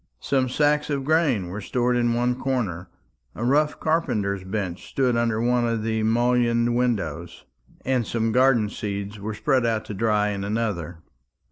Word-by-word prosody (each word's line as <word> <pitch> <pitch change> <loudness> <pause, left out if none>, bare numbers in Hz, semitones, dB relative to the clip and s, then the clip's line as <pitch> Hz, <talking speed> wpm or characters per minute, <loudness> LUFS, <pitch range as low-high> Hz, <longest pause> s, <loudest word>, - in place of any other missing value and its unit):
Some 130 -2 0
sacks 150 +2 +1
of 140 -2 -1
grain 140 - +1
were 100 +4 -5
stored 125 +4 0
in 120 -1 +1
one 120 +1 +1
corner, 120 -10 -3 0.5
a 120 - -5
rough 150 +4 +2
carpenter's 105 - 0
bench 95 -2 -4
stood 130 -3 +1
under 115 -2 +1
one 120 0 +2
of 115 -2 -1
the 110 0 -1
mullioned 120 +1 +2
windows, 115 -12 -2 0.4
and 125 -4 0
some 115 -1 0
garden 125 -3 +4
seeds 100 0 -5
were 105 +1 -5
spread 130 +2 +1
out 115 -2 0
to - - -6
dry 105 0 +1
in 100 -1 -3
another. 100 -6 -3
115 Hz, 160 wpm, -24 LUFS, 105-125 Hz, 0.5 s, garden